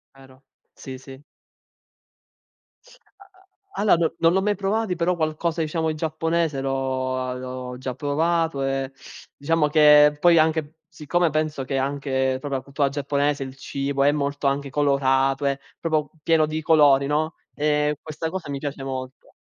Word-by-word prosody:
Vero, 135 Hz, 0 st, -18 dB, 0.3 s
sì, 130 Hz, -1 st, -9 dB
sì. 135 Hz, +1 st, -13 dB, 2.0 s
A 395 Hz, -, -18 dB, 0.5 s
a -, -, -1 dB
allora 205 Hz, -3 st, +5 dB
no 165 Hz, -1 st, +1 dB
non 165 Hz, -, +4 dB
l'ho 190 Hz, -, +2 dB
mai 205 Hz, +1 st, +1 dB
provati, 200 Hz, 0 st, -1 dB
però 175 Hz, +1 st, 0 dB
qualcosa 160 Hz, +1 st, -1 dB
diciamo 160 Hz, 0 st, -1 dB
in 155 Hz, -, -3 dB
giapponese 160 Hz, -1 st, -1 dB
l'ho 130 Hz, -1 st, -2 dB
a 130 Hz, 0 st, -3 dB
l'ho 125 Hz, 0 st, -6 dB
già 130 Hz, 0 st, -5 dB
provato 160 Hz, +1 st, 0 dB
e 135 Hz, 0 st, -2 dB, 0.4 s
diciamo 155 Hz, +1 st, +1 dB
che 150 Hz, -1 st, +6 dB
poi 175 Hz, 0 st, +5 dB
anche 160 Hz, 0 st, +1 dB
siccome 170 Hz, +3 st, 0 dB
penso 155 Hz, -3 st, -2 dB
che 135 Hz, 0 st, -2 dB
anche 135 Hz, -1 st, -1 dB
proprio 140 Hz, 0 st, -4 dB
la 130 Hz, -, -2 dB
cultura 140 Hz, +2 st, -1 dB
giapponese, 140 Hz, 0 st, -1 dB
il 130 Hz, 0 st, -9 dB
cibo 140 Hz, 0 st, -2 dB
è 145 Hz, -, +5 dB
molto 140 Hz, -1 st, -1 dB
anche 140 Hz, 0 st, -1 dB
colorato, 135 Hz, -1 st, +1 dB
è 140 Hz, 0 st, 0 dB, 0.2 s
proprio 155 Hz, -3 st, -1 dB
pieno 160 Hz, -1 st, +3 dB
di 155 Hz, +1 st, -3 dB
colori, 145 Hz, -4 st, +5 dB
no, 155 Hz, +3 st, -1 dB, 0.2 s
ehm, 150 Hz, 0 st, +1 dB
questa 160 Hz, +1 st, -5 dB
cosa 185 Hz, -4 st, -6 dB
mi 140 Hz, -1 st, -3 dB
piace 140 Hz, -1 st, -5 dB
molto. 130 Hz, -1 st, -6 dB
145 Hz, 160 wpm, -23 LUFS, 135-160 Hz, 2.0 s, che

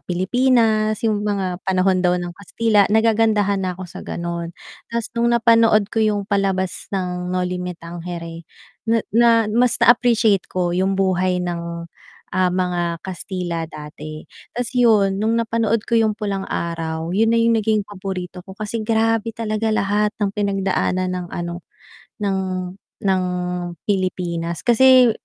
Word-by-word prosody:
Pilipinas, 215 Hz, +3 st, +2 dB
yung 215 Hz, -2 st, +1 dB
mga 195 Hz, -3 st, -2 dB
panahon 185 Hz, 0 st, +1 dB
daw 180 Hz, 0 st, +2 dB
ng 175 Hz, -1 st, -4 dB
Kastila, 205 Hz, +2 st, +1 dB
nagagandahan 215 Hz, -2 st, +2 dB
na 185 Hz, -2 st, -3 dB
ako 185 Hz, -, -7 dB
sa 175 Hz, -, -10 dB
gano’n. 170 Hz, 0 st, -4 dB, 0.4 s
Ta's 230 Hz, -1 st, -4 dB
nung 235 Hz, 0 st, +1 dB
napanood 230 Hz, -3 st, +4 dB
ko 225 Hz, -, +1 dB
yung 210 Hz, -2 st, +1 dB
palabas 195 Hz, -2 st, -1 dB
ng 180 Hz, -2 st, -3 dB
Noli 180 Hz, 0 st, -1 dB
Me 180 Hz, -1 st, -5 dB
Tangere, 170 Hz, -1 st, -8 dB, 0.4 s
na 225 Hz, -1 st, +2 dB
na 235 Hz, +2 st, +5 dB, 0.2 s
mas 245 Hz, +2 st, +3 dB
na-appreciate 230 Hz, -4 st, +3 dB
ko 180 Hz, -1 st, -1 dB
yung 190 Hz, +2 st, +1 dB
buhay 185 Hz, -1 st, +1 dB
ng, 170 Hz, -1 st, -4 dB, 0.5 s
ah, 185 Hz, 0 st, +2 dB
mga 175 Hz, -2 st, -1 dB
Kastila 180 Hz, -3 st, -4 dB
dati. 155 Hz, 0 st, -9 dB, 0.3 s
Ta’s 245 Hz, -1 st, -2 dB
yun, 210 Hz, -6 st, +3 dB
nung 225 Hz, +1 st, +1 dB
napanood 230 Hz, -1 st, 0 dB
ko 230 Hz, -1 st, +2 dB
yung 215 Hz, -2 st, +1 dB
Pulang 200 Hz, -3 st, -3 dB
Araw, 165 Hz, 0 st, -3 dB
yun 220 Hz, +4 st, +3 dB
na 230 Hz, -, +3 dB
yung 230 Hz, -1 st, +3 dB
naging 215 Hz, -1 st, +1 dB
paborito 185 Hz, -3 st, -6 dB
ko 190 Hz, +1 st, -12 dB
kasi 215 Hz, +2 st, -4 dB
grabe 225 Hz, 0 st, 0 dB
talaga 220 Hz, -1 st, -1 dB
lahat 210 Hz, 0 st, +1 dB
ng 205 Hz, -2 st, -1 dB
pinagdaanan 195 Hz, -2 st, 0 dB
ng 180 Hz, -1 st, -4 dB
ano, 175 Hz, 0 st, -5 dB, 0.6 s
ng 195 Hz, -1 st, 0 dB, 0.6 s
ng 190 Hz, -2 st, +2 dB, 0.6 s
Pilipinas 175 Hz, -4 st, -2 dB
kasi 255 Hz, +1 st, +6 dB
195 Hz, 145 wpm, -21 LUFS, 180-220 Hz, 0.6 s, kasi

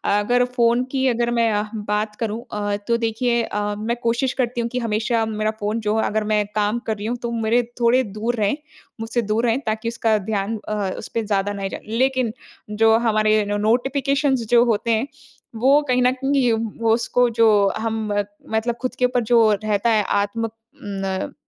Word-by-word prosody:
अगर 245 Hz, +4 st, +2 dB
फ़ोन 235 Hz, 0 st, +3 dB
की 265 Hz, -1 st, +1 dB
अगर 240 Hz, -1 st, +1 dB
मैं 230 Hz, -1 st, +2 dB
अ, 210 Hz, 0 st, +1 dB
बात 210 Hz, 0 st, -2 dB
करूँ 225 Hz, 0 st, -3 dB
अ, 205 Hz, -1 st, -1 dB
तो 235 Hz, -, +2 dB
देखिए 235 Hz, +1 st, 0 dB
अ, 205 Hz, -1 st, -2 dB
मैं 230 Hz, +3 st, -2 dB
कोशिश 240 Hz, +3 st, +1 dB
करती 240 Hz, 0 st, -1 dB
हूँ 235 Hz, -, -2 dB
कि 250 Hz, -, -2 dB
हमेशा 225 Hz, 0 st, 0 dB
मेरा 215 Hz, 0 st, -1 dB
फ़ोन 210 Hz, +2 st, -1 dB
जो 215 Hz, -, +2 dB
अगर 215 Hz, 0 st, 0 dB
मैं 210 Hz, -1 st, +2 dB
काम 210 Hz, +2 st, +1 dB
कर 220 Hz, -, -1 dB
रही 205 Hz, -, -6 dB
हूँ 245 Hz, +1 st, -2 dB
तो -, -, -4 dB
मेरे 235 Hz, +2 st, +2 dB, 0.2 s
थोड़े 245 Hz, +2 st, +4 dB
दूर 235 Hz, +3 st, -1 dB
रहें, 210 Hz, +5 st, 0 dB, 0.4 s
मुझसे 225 Hz, +2 st, -1 dB
दूर 220 Hz, +2 st, 0 dB
रहें 235 Hz, +3 st, +2 dB
ताकि 220 Hz, +1 st, -2 dB
उसका 225 Hz, -2 st, +1 dB
ध्यान 210 Hz, +1 st, -2 dB
अ, 210 Hz, -2 st, -1 dB
उसपे 230 Hz, -, -4 dB
ज़्यादा 205 Hz, -1 st, 0 dB
नहीं 195 Hz, -1 st, -4 dB
जाए। -, -, -7 dB, 0.2 s
लेकिन, 255 Hz, -3 st, +1 dB, 0.4 s
जो 220 Hz, +1 st, +4 dB
हमारे 215 Hz, -1 st, +3 dB
नो 205 Hz, 0 st, -1 dB
नोटिफिकेशन्स 270 Hz, +3 st, +1 dB
जो 240 Hz, 0 st, +6 dB
होते 230 Hz, 0 st, 0 dB
हैं, 225 Hz, +4 st, +1 dB, 0.5 s
वो 275 Hz, +5 st, +5 dB
कहीं 250 Hz, -1 st, +2 dB
न 250 Hz, +1 st, +4 dB
कहीं 270 Hz, -1 st, +1 dB, 0.3 s
वो 225 Hz, -1 st, +3 dB
उसको 240 Hz, +1 st, +2 dB
जो 230 Hz, -, +7 dB, 0.3 s
हम 225 Hz, 0 st, -2 dB
मत 205 Hz, 0 st, -1 dB, 0.2 s
मतलब 225 Hz, +2 st, 0 dB
खुद 255 Hz, -, -3 dB
के 250 Hz, -, +4 dB
ऊपर 245 Hz, 0 st, +1 dB
जो 240 Hz, -1 st, +6 dB, 0.2 s
रहता 210 Hz, +2 st, +1 dB
है 215 Hz, -2 st, +3 dB
आत्म 205 Hz, +3 st, -1 dB
उम, -, -, -3 dB, 0.3 s
न 195 Hz, -2 st, -3 dB
225 Hz, 195 wpm, -21 LUFS, 210-240 Hz, 0.5 s, जो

